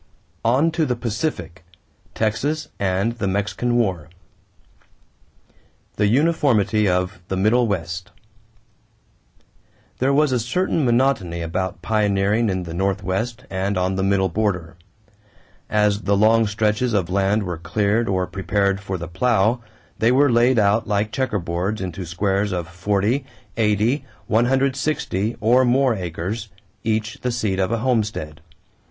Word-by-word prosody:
ON 130 +8 +3
TO 160 0 0
THE 125 - 0
PACIFIC 115 - -4 0.5
TEXAS 140 +8 -1
AND 95 +3 +1
THE 100 - -1
MEXICAN 100 +5 -1
WAR 90 -9 -1 1.9
=The 105 - +3
Uniformity 120 -6 +2
of 90 +1 -1
the 95 - -2
Middle 115 +5 +3
West.= 90 -2 -3 1.9
There 130 +2 +2
was 145 0 +3
a 125 - +1
certain 155 +7 0
monotony 120 -9 +1
about 90 +1 -3
pioneering 105 +1 +1
in 95 -1 -1
the 85 -1 -7
Northwest 100 +6 -2
and 95 +1 -2
on 90 +1 0
the 95 - -1
middle 95 0 +2
border. 90 -4 -2 0.9
As 105 -1 +2
the 100 0 +1
long 110 +2 +4
stretches 110 +3 0
of 90 -4 0
land 100 +2 +1
were 90 -3 -4
cleared 105 +6 0
or 95 -1 +1
prepared 100 0 0
for 95 -1 -4
the 85 -1 -6
plow, 115 +4 +1 0.4
they 115 +2 +4
were 140 +1 +4
laid 120 +2 +4
out 105 +2 +2
like 105 0 0
checkerboards 100 -5 -2
into 90 -1 -5
squares 100 +3 0
of 90 -3 -3
forty, 100 +8 0 0.3
eighty, 110 +5 +1 0.2
one 115 +2 +2
hundred 135 +1 +2
sixty, 120 -7 -2
or 120 +4 +4
more 130 +1 +3
acres, 90 +3 -4 0.4
each 110 0 -1
the 125 - -1
seat 105 -5 -1
of 95 +2 0
a 115 - +1
homestead. 105 - -1
105 Hz, 135 wpm, -21 LUFS, 95-120 Hz, 1.9 s, long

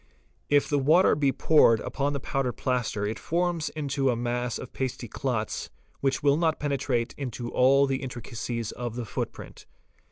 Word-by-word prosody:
If 145 -1 +4
the 145 - +1
water 160 +7 +5
be 140 -2 +2
poured 130 -7 +5
upon 145 0 -1
the 140 - -2
powdered 135 -2 -1
plaster 120 -5 -1
it 110 +2 -3
forms 170 -1 0
into 140 -3 -1
a 125 - +2
mass 120 0 -2
of - - -9
pasty 130 -2 -3
clots 110 -2 -3 0.3
which 135 0 0
will 140 0 +4
not 160 -1 +1
penetrate 135 -5 -1
into 125 -3 -4
all 135 +2 +5
the 135 -1 -1
intricacies 120 -2 -4
of 120 -2 -5
the 120 -1 -4
footprint. - - -6
130 Hz, 165 wpm, -27 LUFS, 120-145 Hz, 0.3 s, water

